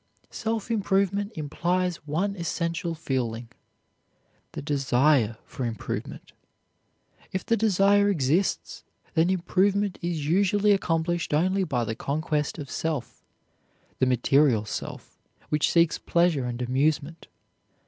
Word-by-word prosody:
Self 225 Hz, 0 st, -3 dB
improvement 200 Hz, -1 st, +1 dB
implies 175 Hz, +4 st, -1 dB
one 190 Hz, +7 st, -1 dB
essential 170 Hz, -1 st, -2 dB
feeling: 120 Hz, -6 st, -3 dB, 1.0 s
the -, -, -5 dB
desire 135 Hz, -4 st, +2 dB
for 130 Hz, -, -6 dB
improvement. 115 Hz, -3 st, -5 dB, 1.0 s
If 190 Hz, -, -3 dB
the 230 Hz, -, +2 dB
desire 205 Hz, -1 st, +3 dB
exists, 165 Hz, +1 st, 0 dB, 0.3 s
then 165 Hz, +1 st, +3 dB
improvement 190 Hz, +2 st, +1 dB
is 170 Hz, -4 st, -2 dB
usually 200 Hz, +4 st, +3 dB
accomplished 170 Hz, -4 st, 0 dB
only 185 Hz, +5 st, +2 dB
by 135 Hz, -9 st, -1 dB
the 110 Hz, -, -2 dB
conquest 150 Hz, +4 st, -2 dB
of 145 Hz, -4 st, -7 dB
self 160 Hz, -6 st, -3 dB, 0.8 s
the 130 Hz, -, +3 dB
material 125 Hz, -2 st, +3 dB
self, -, -, -7 dB, 0.3 s
which 150 Hz, 0 st, +2 dB
seeks 170 Hz, -1 st, +3 dB
pleasure 170 Hz, -6 st, +1 dB
and 120 Hz, 0 st, -3 dB
amusement. 145 Hz, +5 st, -1 dB
165 Hz, 110 wpm, -26 LUFS, 140-190 Hz, 1.0 s, desire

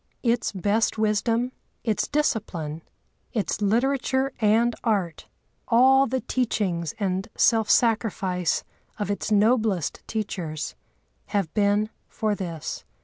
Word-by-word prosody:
Its 235 Hz, -1 st, +1 dB
best 205 Hz, +4 st, +1 dB
wisdom, 225 Hz, +3 st, +1 dB, 0.3 s
its 220 Hz, -3 st, 0 dB
discipline, 175 Hz, -, -1 dB, 0.5 s
its 215 Hz, -1 st, -1 dB
literature 265 Hz, +5 st, +1 dB
and 225 Hz, +2 st, +3 dB
art, 195 Hz, -8 st, -1 dB, 0.4 s
all 265 Hz, +3 st, +5 dB
the 260 Hz, +1 st, -1 dB
teachings 190 Hz, -, -1 dB
and 190 Hz, -1 st, -1 dB
self 225 Hz, -3 st, +3 dB
sacrifice 195 Hz, -6 st, +2 dB, 0.3 s
of 205 Hz, -1 st, -2 dB
its 205 Hz, -, -3 dB
noblest 215 Hz, -, +2 dB
teachers, 175 Hz, -8 st, -3 dB, 0.5 s
have 195 Hz, -6 st, -1 dB
been 205 Hz, +1 st, +2 dB, 0.2 s
for 215 Hz, -1 st, -1 dB
this. 170 Hz, -6 st, -5 dB
215 Hz, 105 wpm, -25 LUFS, 190-235 Hz, 0.5 s, all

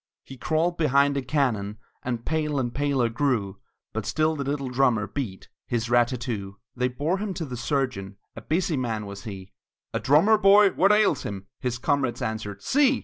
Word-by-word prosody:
He 135 Hz, -, -11 dB
crawled 160 Hz, +6 st, 0 dB
behind 140 Hz, -2 st, +3 dB
a 140 Hz, -, 0 dB
cannon, 115 Hz, -8 st, -1 dB, 0.2 s
And 120 Hz, -2 st, -4 dB
pale 150 Hz, -3 st, 0 dB
and 120 Hz, -2 st, -2 dB
paler 140 Hz, -4 st, +1 dB
grew; 115 Hz, -6 st, -1 dB, 0.3 s
But 110 Hz, -2 st, -3 dB
still 155 Hz, 0 st, +1 dB
the 140 Hz, -, -3 dB
little 140 Hz, -1 st, -2 dB
drummer 125 Hz, -5 st, +2 dB
beat 105 Hz, -6 st, -5 dB, 0.2 s
His 120 Hz, 0 st, -2 dB
rat 120 Hz, -1 st, +5 dB
tat 125 Hz, -1 st, -5 dB
too! 100 Hz, -6 st, -4 dB, 0.2 s
They 125 Hz, 0 st, +1 dB
bore 150 Hz, +9 st, -1 dB
him 200 Hz, -2 st, -3 dB
to 165 Hz, -, -3 dB
the 125 Hz, -3 st, -6 dB
surgeon, 120 Hz, -6 st, -2 dB, 0.2 s
A -, -, -8 dB
busy 165 Hz, -1 st, 0 dB
man 115 Hz, -4 st, -2 dB
was 100 Hz, -1 st, -9 dB
he: 95 Hz, -3 st, -8 dB, 0.4 s
"A -, -, 0 dB
drummer 200 Hz, +11 st, +4 dB
boy 200 Hz, 0 st, +6 dB
what 195 Hz, +3 st, +3 dB
ails 210 Hz, -9 st, +3 dB
him?" 100 Hz, -1 st, -6 dB
His 125 Hz, -3 st, -2 dB
comrades 130 Hz, -1 st, 0 dB
answered, 105 Hz, -2 st, -4 dB
"See!" 275 Hz, -1 st, +3 dB
130 Hz, 190 wpm, -25 LUFS, 110-155 Hz, 0.4 s, boy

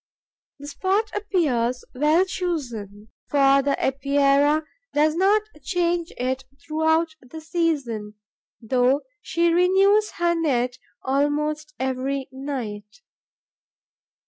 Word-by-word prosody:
The 285 Hz, -, -11 dB
spot 385 Hz, +9 st, -1 dB
appears 275 Hz, -, 0 dB
well 305 Hz, +7 st, +3 dB
chosen, 240 Hz, -, -4 dB, 0.2 s
for 275 Hz, -1 st, +4 dB
the 280 Hz, 0 st, +1 dB
Epeira 280 Hz, +2 st, +2 dB, 0.3 s
does 305 Hz, +1 st, +3 dB
not 395 Hz, +5 st, +3 dB, 0.2 s
change 345 Hz, -2 st, -1 dB
it 260 Hz, +1 st, -2 dB, 0.2 s
throughout 320 Hz, +1 st, +1 dB
the 260 Hz, +6 st, -10 dB
season, 285 Hz, -, -2 dB, 0.4 s
though 250 Hz, +4 st, +2 dB, 0.2 s
she 340 Hz, 0 st, +1 dB
renews 390 Hz, +4 st, +4 dB
her 345 Hz, 0 st, +1 dB
net 255 Hz, -7 st, 0 dB, 0.2 s
almost 300 Hz, +2 st, -1 dB
every 265 Hz, +1 st, -2 dB
night. 250 Hz, -, -6 dB
290 Hz, 95 wpm, -23 LUFS, 260-340 Hz, 0.4 s, for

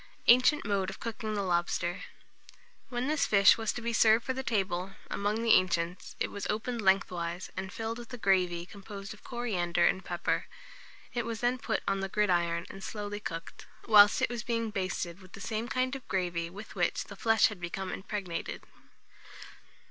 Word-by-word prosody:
ANCIENT 255 Hz, +4 st, +6 dB
MODE 200 Hz, -2 st, 0 dB
OF 195 Hz, -, -8 dB
COOKING 220 Hz, -2 st, -4 dB
THE 200 Hz, -, 0 dB
LOBSTER. 175 Hz, 0 st, 0 dB, 0.8 s
When 245 Hz, 0 st, -2 dB
this 305 Hz, 0 st, +1 dB
fish 200 Hz, -2 st, +7 dB
was 225 Hz, -1 st, -1 dB
to 240 Hz, -, -6 dB
be 235 Hz, 0 st, -1 dB
served 225 Hz, 0 st, +5 dB
for 260 Hz, -, 0 dB
the 265 Hz, -, -3 dB
table, 195 Hz, -5 st, -1 dB, 0.2 s
among 210 Hz, +3 st, -1 dB
the 230 Hz, -, +5 dB
ancients, 175 Hz, -1 st, +1 dB
it -, -, -1 dB
was 200 Hz, -, -4 dB
opened 225 Hz, +2 st, -2 dB
lengthwise, 185 Hz, -3 st, 0 dB
and 190 Hz, 0 st, -4 dB
filled 225 Hz, +1 st, -4 dB
with 240 Hz, 0 st, -10 dB
a 250 Hz, -, -5 dB
gravy 180 Hz, -5 st, +2 dB
composed 200 Hz, +1 st, -9 dB
of 210 Hz, -, -17 dB
coriander 180 Hz, -9 st, 0 dB
and 190 Hz, -, +2 dB
pepper. 175 Hz, -1 st, -1 dB, 0.7 s
It 240 Hz, -, 0 dB
was 225 Hz, -1 st, -4 dB
then 245 Hz, +1 st, +1 dB
put -, -, -2 dB
on 195 Hz, 0 st, +1 dB
the 195 Hz, 0 st, -3 dB
gridiron 175 Hz, -5 st, +1 dB
and 195 Hz, -, -10 dB
slowly 205 Hz, 0 st, -4 dB
cooked, 165 Hz, -5 st, -7 dB, 0.2 s
whilst 210 Hz, -2 st, +7 dB
it -, -, +3 dB
was 240 Hz, -2 st, -3 dB
being 230 Hz, -1 st, -1 dB
basted 185 Hz, -2 st, -3 dB
with 185 Hz, -1 st, -16 dB
the -, -, -9 dB
same 220 Hz, +3 st, -3 dB
kind 255 Hz, +2 st, 0 dB
of 265 Hz, -, -9 dB
gravy 175 Hz, -3 st, -1 dB
with 200 Hz, +5 st, -10 dB
which -, -, 0 dB
the -, -, -11 dB
flesh 225 Hz, -1 st, +4 dB
had 205 Hz, -4 st, -9 dB
become 185 Hz, +2 st, -4 dB
impregnated. 190 Hz, -3 st, -4 dB
200 Hz, 185 wpm, -30 LUFS, 185-225 Hz, 0.8 s, fish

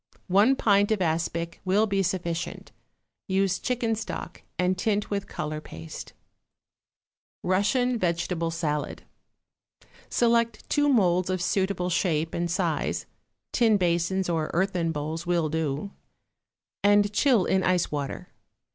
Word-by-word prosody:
One 205 Hz, +8 st, +5 dB
pint 205 Hz, -5 st, +3 dB
of 215 Hz, -, +2 dB
aspic 170 Hz, 0 st, -1 dB
will 195 Hz, +3 st, +3 dB
be 200 Hz, -2 st, 0 dB
sufficient; 175 Hz, -2 st, -3 dB, 0.6 s
use 190 Hz, -1 st, +1 dB
chicken 240 Hz, -2 st, 0 dB
stock, 220 Hz, 0 st, -5 dB, 0.2 s
and 180 Hz, +1 st, +2 dB
tint 205 Hz, +2 st, -1 dB
with 200 Hz, -1 st, -2 dB
color 155 Hz, 0 st, -4 dB
paste. 80 Hz, -, -9 dB, 1.3 s
=Russian 235 Hz, +7 st, +1 dB
Vegetable 170 Hz, -1 st, -1 dB
Salad.= 155 Hz, -3 st, -3 dB, 1.1 s
Select 235 Hz, -1 st, +1 dB
two 290 Hz, -1 st, +3 dB
moulds 185 Hz, -8 st, +3 dB
of 185 Hz, 0 st, 0 dB
suitable 180 Hz, 0 st, 0 dB
shape 165 Hz, -3 st, 0 dB
and 170 Hz, 0 st, -1 dB
size 170 Hz, -4 st, -1 dB, 0.5 s
(tin 225 Hz, -4 st, +4 dB
basins 175 Hz, +1 st, +1 dB
or 160 Hz, -3 st, -1 dB
earthen 180 Hz, -2 st, +1 dB
bowls 160 Hz, +2 st, -4 dB
will 170 Hz, -3 st, +1 dB
do) 160 Hz, +3 st, -2 dB, 0.9 s
and 205 Hz, 0 st, +4 dB
chill 235 Hz, -4 st, +3 dB
in 190 Hz, -, +2 dB
ice 180 Hz, -2 st, +1 dB
water. 145 Hz, -2 st, -4 dB
185 Hz, 120 wpm, -26 LUFS, 165-205 Hz, 1.3 s, One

